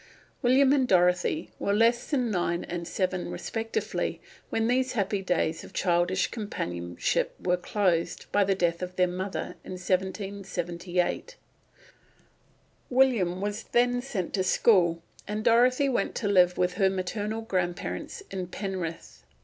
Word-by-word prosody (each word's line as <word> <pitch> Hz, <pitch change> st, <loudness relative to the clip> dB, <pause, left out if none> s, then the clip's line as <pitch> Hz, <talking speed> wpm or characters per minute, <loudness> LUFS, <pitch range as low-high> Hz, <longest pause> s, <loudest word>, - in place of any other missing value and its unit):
William 265 Hz, +2 st, +5 dB
and 265 Hz, -3 st, +3 dB
Dorothy 180 Hz, -4 st, +2 dB
were 200 Hz, -, +1 dB
less 230 Hz, +2 st, +3 dB
than 250 Hz, -6 st, +1 dB
nine 175 Hz, -2 st, 0 dB
and 170 Hz, -1 st, -5 dB
seven 185 Hz, -1 st, -1 dB
respectively 225 Hz, 0 st, -3 dB, 0.3 s
when 225 Hz, 0 st, 0 dB
these 255 Hz, +1 st, +1 dB
happy 200 Hz, -3 st, 0 dB
days 170 Hz, -3 st, 0 dB
of -, -, -12 dB
childish 175 Hz, +1 st, +1 dB
companionship 85 Hz, -, -2 dB
were 180 Hz, 0 st, +1 dB
closed 180 Hz, -2 st, 0 dB
by 205 Hz, -, +4 dB
the 195 Hz, 0 st, +1 dB
death 170 Hz, -2 st, 0 dB
of 180 Hz, 0 st, -5 dB
their 180 Hz, -, +4 dB
mother 185 Hz, +2 st, -4 dB
in -, -, -7 dB
1778. 185 Hz, -, -2 dB, 1.5 s
William 235 Hz, -9 st, +3 dB
was 205 Hz, +2 st, -2 dB
then 245 Hz, +1 st, +1 dB
sent 210 Hz, -9 st, -4 dB
to 190 Hz, -, +1 dB
school, 175 Hz, -4 st, +3 dB, 0.2 s
and 210 Hz, +1 st, -3 dB
Dorothy 250 Hz, +5 st, +4 dB
went 260 Hz, -, 0 dB
to 210 Hz, -, -1 dB
live 180 Hz, -3 st, +4 dB
with 180 Hz, 0 st, +1 dB
her 190 Hz, -, +5 dB
maternal 205 Hz, +4 st, -3 dB
grandparents 185 Hz, -, -3 dB
at 185 Hz, -2 st, -4 dB
Penrith. 185 Hz, -, -5 dB
190 Hz, 135 wpm, -27 LUFS, 180-225 Hz, 1.5 s, William